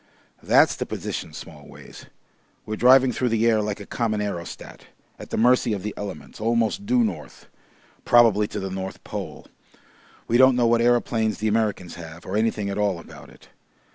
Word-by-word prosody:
That's -, -, +4 dB
the -, -, -5 dB
position, -, -, -5 dB
Smallways. -, -, -12 dB, 0.6 s
We're 110 Hz, -, -4 dB
driving 130 Hz, +3 st, +5 dB
through 125 Hz, +1 st, -1 dB
the 115 Hz, 0 st, +1 dB
air 110 Hz, -2 st, +3 dB
like 105 Hz, 0 st, -3 dB
a 100 Hz, -, -9 dB
common 110 Hz, -2 st, -2 dB
aerostat, 100 Hz, -5 st, -6 dB, 0.3 s
at -, -, -10 dB
the -, -, -3 dB
mercy 120 Hz, 0 st, +3 dB
of 100 Hz, -3 st, -4 dB
the 105 Hz, -1 st, -4 dB
elements, 105 Hz, +1 st, -8 dB
almost 115 Hz, -, 0 dB
due 245 Hz, 0 st, +3 dB
north 220 Hz, -, -5 dB, 0.6 s
probably 115 Hz, -4 st, +4 dB
to -, -, -5 dB
the 95 Hz, 0 st, -5 dB
North 95 Hz, 0 st, -6 dB
Pole. -, -, -7 dB, 0.8 s
We 120 Hz, -, +2 dB
don't 130 Hz, 0 st, +6 dB
know 120 Hz, -1 st, +2 dB
what 115 Hz, 0 st, +3 dB
aeroplanes 115 Hz, -2 st, +1 dB
the 110 Hz, -, -2 dB
Americans 105 Hz, -5 st, -1 dB
have, 80 Hz, +1 st, -11 dB
or 95 Hz, -, -4 dB
anything 110 Hz, -1 st, 0 dB
at 100 Hz, +1 st, -3 dB
all 100 Hz, -3 st, +1 dB
about 85 Hz, -, -13 dB
it. -, -, -19 dB
110 Hz, 175 wpm, -23 LUFS, 100-120 Hz, 0.8 s, don't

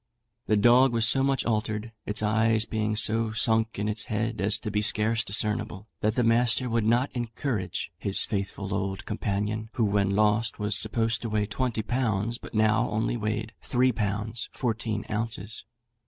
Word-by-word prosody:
The 110 Hz, -, +3 dB
dog 120 Hz, +4 st, +5 dB
was 115 Hz, -1 st, +3 dB
so 135 Hz, -, +3 dB
much 135 Hz, 0 st, +1 dB
altered, 110 Hz, 0 st, -2 dB, 0.2 s
its 105 Hz, +1 st, -1 dB
eyes 110 Hz, +1 st, +2 dB
being 110 Hz, -1 st, -1 dB
so 110 Hz, +1 st, +1 dB
sunk 110 Hz, -1 st, +2 dB
in 105 Hz, +1 st, -2 dB
its 105 Hz, +1 st, -1 dB
head 110 Hz, -3 st, -2 dB
as 105 Hz, +2 st, +2 dB
to 105 Hz, -, -5 dB
be 105 Hz, +1 st, 0 dB
scarce 110 Hz, +1 st, +3 dB
discernible, 105 Hz, 0 st, -1 dB
that 110 Hz, +1 st, 0 dB
the 125 Hz, -, +2 dB
master 115 Hz, +2 st, +2 dB
would 115 Hz, -2 st, +1 dB
not 120 Hz, +5 st, +2 dB
encourage 115 Hz, -7 st, -3 dB
his 100 Hz, -1 st, +4 dB
faithful 100 Hz, -1 st, -3 dB
old 95 Hz, -1 st, -3 dB
companion, 105 Hz, +1 st, -2 dB
who 115 Hz, -, +1 dB
when 100 Hz, -1 st, +1 dB
lost 105 Hz, +1 st, +2 dB
was 105 Hz, 0 st, 0 dB
supposed 115 Hz, +1 st, 0 dB
to 115 Hz, -, -4 dB
weigh 105 Hz, -1 st, 0 dB
twenty 110 Hz, +1 st, -2 dB
pounds, 115 Hz, -1 st, -1 dB
but -, -, -11 dB
now 110 Hz, +2 st, +2 dB
only 110 Hz, +3 st, -1 dB
weighed 110 Hz, 0 st, -3 dB
three 130 Hz, 0 st, +2 dB
pounds 110 Hz, +1 st, -2 dB
fourteen 110 Hz, -3 st, -2 dB
ounces. 110 Hz, -1 st, -4 dB
110 Hz, 170 wpm, -27 LUFS, 105-115 Hz, 0.2 s, dog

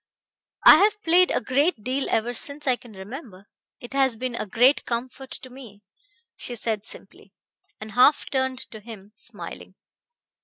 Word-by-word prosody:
"I -, -, +11 dB
have 420 Hz, +1 st, +3 dB
played 355 Hz, +2 st, +5 dB
a -, -, +1 dB
great 260 Hz, -, 0 dB
deal 265 Hz, +3 st, -1 dB
ever 235 Hz, +2 st, 0 dB
since 285 Hz, +5 st, -3 dB
I 255 Hz, -2 st, +3 dB
can 240 Hz, -2 st, -16 dB
remember. 200 Hz, -, -10 dB, 0.3 s
It 240 Hz, -, -10 dB
has 265 Hz, -4 st, +2 dB
been 255 Hz, +1 st, -3 dB
a 230 Hz, -, -4 dB
great 245 Hz, +7 st, +4 dB
comfort 255 Hz, +3 st, -5 dB
to 255 Hz, -, -10 dB
me," 230 Hz, -6 st, -13 dB, 0.5 s
she 245 Hz, -, -7 dB
said 220 Hz, -2 st, -3 dB
simply, -, -, -11 dB, 0.5 s
and 215 Hz, 0 st, -9 dB
half 255 Hz, +7 st, +4 dB
turned 260 Hz, -1 st, 0 dB
to 220 Hz, -, -9 dB
him 210 Hz, -2 st, -12 dB
smiling. 220 Hz, -, -7 dB
245 Hz, 160 wpm, -24 LUFS, 220-270 Hz, 0.5 s, I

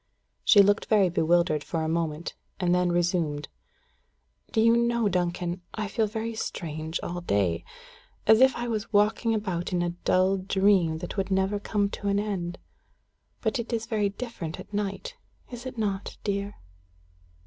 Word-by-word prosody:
She 205 Hz, -3 st, +7 dB
looked 205 Hz, +2 st, +2 dB
very 205 Hz, -4 st, +4 dB
bewildered 170 Hz, -2 st, +2 dB
for 165 Hz, -2 st, -2 dB
a -, -, -1 dB
moment, 160 Hz, -1 st, -2 dB, 0.3 s
and 180 Hz, -2 st, +2 dB
then 180 Hz, 0 st, +2 dB
resumed: 170 Hz, -4 st, 0 dB, 1.0 s
"Do 225 Hz, -, +1 dB
you 230 Hz, +1 st, +5 dB
know, 235 Hz, -1 st, +2 dB
Duncan, 175 Hz, -1 st, -1 dB
I 215 Hz, -1 st, -2 dB
feel 220 Hz, +2 st, 0 dB
very 225 Hz, +2 st, -3 dB
strange 160 Hz, -6 st, -4 dB
all 175 Hz, 0 st, -4 dB
day 95 Hz, -, 0 dB, 0.6 s
as 220 Hz, +2 st, +6 dB
if 265 Hz, 0 st, +6 dB
I 240 Hz, -, -3 dB
was 220 Hz, -2 st, -3 dB
walking 220 Hz, +2 st, +3 dB
about 185 Hz, -5 st, -2 dB
in 175 Hz, -1 st, +1 dB
a 175 Hz, -, -1 dB
dull 185 Hz, +2 st, +2 dB
dream 190 Hz, -3 st, +2 dB
that 175 Hz, -, -8 dB
would 195 Hz, -1 st, -1 dB
never 190 Hz, +1 st, +1 dB
come 205 Hz, 0 st, 0 dB
to 200 Hz, -, -5 dB
an 200 Hz, 0 st, +2 dB
end? 185 Hz, -4 st, -3 dB, 0.8 s
But 270 Hz, -, 0 dB
it 235 Hz, -, -4 dB
is 225 Hz, -1 st, -1 dB
very 215 Hz, -3 st, 0 dB
different 200 Hz, -7 st, -6 dB
at -, -, -11 dB
night 205 Hz, -, -3 dB, 0.3 s
is 245 Hz, +1 st, -7 dB
it 255 Hz, -, -8 dB
not, 200 Hz, -3 st, -2 dB
dear?" 200 Hz, 0 st, -2 dB
195 Hz, 165 wpm, -27 LUFS, 175-215 Hz, 1.0 s, She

